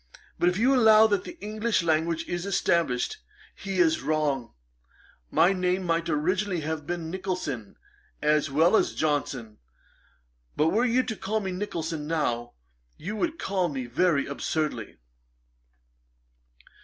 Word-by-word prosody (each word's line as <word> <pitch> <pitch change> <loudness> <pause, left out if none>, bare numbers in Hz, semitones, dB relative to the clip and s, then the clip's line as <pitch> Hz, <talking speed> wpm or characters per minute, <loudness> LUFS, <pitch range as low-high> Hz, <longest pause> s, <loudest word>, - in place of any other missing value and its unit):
But 175 - +4
if 180 - -2
you 255 +5 +4
allow 220 -3 +7
that 205 -3 +1
the 350 - -9
English 215 -1 0
language 165 0 0
is 175 +2 -3
established, 170 -9 +1 0.4
he 195 -1 -5
is 325 -2 +3
wrong. 145 -6 -1 0.7
My 180 +3 +4
name 185 0 0
might 170 -1 0
originally 180 +4 0
have 155 -1 -4
been 170 -2 -3
Nicholson, 180 - -4 0.4
as 150 0 +2
well 160 +8 +4
as - - +2
Johnson; 135 -7 -2 1.0
but 155 +2 +3
were 225 +8 +2
you 250 +1 +3
to 220 - -4
call 215 +2 -2
me 190 -3 -3
Nicholson 165 -5 -4
now, 120 -7 -1 0.4
you 200 +7 -5
would 320 +8 -1
call 190 - 0
me 135 -3 -4
very 140 +4 +1
absurdly.' 140 -5 -3
170 Hz, 135 wpm, -27 LUFS, 150-200 Hz, 1.0 s, allow